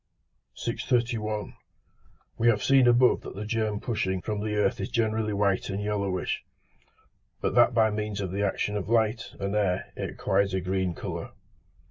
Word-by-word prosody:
631. 110 -4 -1 0.8
We 115 - +1
have 110 -3 +3
seen 135 -2 +5
above 120 +1 +5
that - - -9
the 105 +2 -5
germ 110 -1 -1
pushing 95 -6 -1
from 105 +3 -3
the 105 0 -2
earth 120 +4 +1
is - - -3
generally 110 -1 0
white 100 -1 +1
and 100 0 -2
yellowish, 100 -3 -2 1.0
but - - -1
that 120 - +5
by 110 -2 +4
means 105 -1 -3
of 95 -3 -3
the 100 +2 -2
action 105 +1 0
of 105 0 -3
light 115 +1 +1
and 100 +1 -2
air 95 -4 0
it - - -3
acquires 100 -1 0
a - - +1
green 95 -1 -1
colour. - - -6
105 Hz, 165 wpm, -27 LUFS, 100-115 Hz, 1.0 s, seen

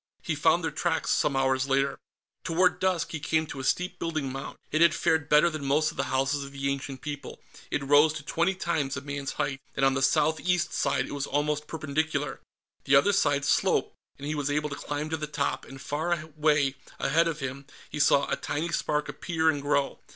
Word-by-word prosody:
He 160 - -1
found 160 +3 +3
their 160 - -1
tracks, 165 -2 -1
some 140 - +2
hours 130 0 +1
later. 135 +1 +1 0.4
Toward 180 +2 +2
dusk, 185 -3 0
he 160 - -4
came 160 +2 0
to 140 - -8
a - - -5
steep 180 +7 -1
building 155 -5 -2
mound. 135 +1 -6
It 155 - +1
had 170 -1 +6
fared 160 -2 +1
better 150 +3 +6
than 155 -4 -3
most 150 +3 +2
of - - -16
the - - 0
houses 135 +2 0
of 140 - -9
the 140 0 -1
ancient 135 -1 -5
people; 145 -1 -6 0.3
it 140 - -1
rose 145 +3 +5
to 150 - -7
twenty 170 +5 0
times 155 -7 -1
a - - -4
man's 140 -1 -4
height 135 0 -2
and 135 - +2
on 135 - +4
the 135 - -1
south 155 +3 +3
east 180 -1 0
side 140 - +1
it - - -9
was 140 -1 -3
almost 150 +1 -1
perpendicular. 155 -2 -2 0.4
The 140 - +4
other 200 +9 +5
side 145 -7 +2
sloped, - - +2 0.2
and 140 - -8
he 150 - -1
was 145 -2 -2
able 150 +1 0
to - - -3
climb 145 +2 -4
to 160 - 0
the 150 0 -4
top, 145 -1 -2
and 135 - -11
far 155 +6 -1
away, 150 -3 +1 0.2
ahead 165 +5 +3
of 160 -2 -3
him, 135 0 -5 0.2
he 150 - -4
saw 145 -1 +4
a - - 0
tiny 160 +4 -3
spark 150 -3 0
appear 160 -2 0
and 145 -2 -4
grow. 140 -1 0
150 Hz, 220 wpm, -27 LUFS, 140-160 Hz, 0.4 s, had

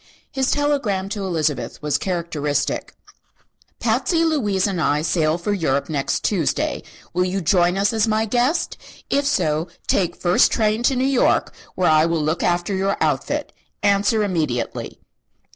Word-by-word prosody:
His 265 -1 0
telegram 275 -10 0
to 205 -1 -4
Elizabeth 160 -6 -2
was 150 -1 0
characteristic: 155 -6 -2 0.8
"Patsy, 330 -2 +1
Louise 210 - +1
and 190 -4 -1
I 150 0 +1
sail 155 -1 +1
for 190 +4 -2
Europe 150 -8 0
next 145 -3 -1
Tuesday. 180 -8 0 0.3
Will 180 +1 +1
you 185 +2 -1
join 175 +1 +2
us 200 +3 +1
as 220 0 +2
my 220 0 +1
guest? 245 - 0 0.3
If 280 0 +2
so, 155 - 0 0.2
take 175 -3 +1
first 175 0 +3
train 215 0 +1
to 270 - -1
New 255 +1 +1
York, 270 -2 +2 0.2
where 180 -3 +2
I 155 +1 +4
will 165 -2 0
look 160 +3 -1
after 175 +2 0
your 195 +1 0
outfit. - - -1 0.3
Answer 205 +2 +3
immediately." 155 - -2
190 Hz, 150 wpm, -21 LUFS, 160-215 Hz, 0.8 s, I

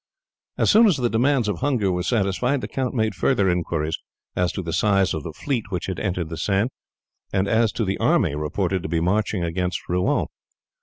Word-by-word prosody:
As - - +3
soon 225 +1 +7
as 180 -7 +3
the 120 -2 0
demands 125 0 +2
of 105 -5 -2
hunger 120 -9 +1
were 90 0 -1
satisfied 120 +6 0
the - - -4
count 130 -1 -3
made 110 -3 +1
further 100 -7 +2
inquiries 80 -3 -1 0.4
as 90 -1 +1
to 95 - -4
the 85 -1 -4
size 95 +1 +2
of 80 - -3
the 80 - -6
fleet 120 - -2
which 90 - -3
had 95 -3 -4
entered 90 -5 -2
the 80 - -5
Seine, 100 - +1 0.6
and 95 0 +1
as 110 +1 +3
to 115 - -1
the 95 0 -2
army - - +2
reported 90 +5 -1
to 80 - -5
be 85 0 +1
marching 100 +2 0
against 90 +2 -2
Rouen. 90 +1 +1
95 Hz, 205 wpm, -23 LUFS, 90-115 Hz, 0.6 s, soon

